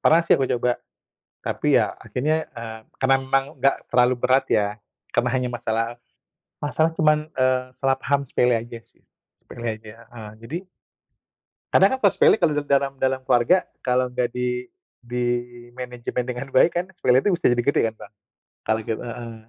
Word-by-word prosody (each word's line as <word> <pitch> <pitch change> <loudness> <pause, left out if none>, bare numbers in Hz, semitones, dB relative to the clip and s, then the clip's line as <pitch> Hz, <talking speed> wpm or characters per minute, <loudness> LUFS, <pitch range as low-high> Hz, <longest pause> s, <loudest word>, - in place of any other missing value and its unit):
pernah 165 +2 +5
sih - - +5
aku 135 - +1
coba, 120 0 0 0.6
tapi - - +1
ya - - -1
akhirnya, 155 +5 -2
eee, 115 -2 -7 0.2
karena 135 0 +4
memang 135 +1 +1
enggak 135 +2 +3 0.2
terlalu 125 0 +4
berat 130 +2 +3
ya, 105 -1 +3 0.5
karena - - +2
hanya 125 -1 0
masalah 115 -1 -1 0.8
masalah 160 +2 +1
cuman, 155 0 +2
eee, 130 -1 +2 0.2
selah 135 0 +2
paham 140 0 +1
sepele 125 -1 +2
aja 115 +1 -7
sih, - - -34 0.4
sepele 120 0 -7
aja, 110 0 -12 0.2
heeh, 110 -3 -9
jadi 145 +9 -4 1.2
kadang 195 +7 +5
kan - - -16
kalo 200 - +6
sepele - - +5
kalo 170 -7 +2 0.2
dalam 140 0 +2
dalam 130 0 0
keluarga, 135 +10 +3 0.2
kalau 125 0 0
nggak 125 -1 0
di 125 0 -2 0.3
dimanajemen 120 0 -4
dengan 125 +1 -4
baik 165 +6 +4
kan 180 - -2
sepele 130 -8 +3
itu 205 - +3
bisa 170 - +2
jadi 120 0 +2
gede 140 - +2
kan - - -22
Bang, 100 - -12 0.5
kalo 110 - +2
kit 110 - 0
heeh, 120 -1 -7
125 Hz, 165 wpm, -23 LUFS, 120-135 Hz, 1.2 s, kalo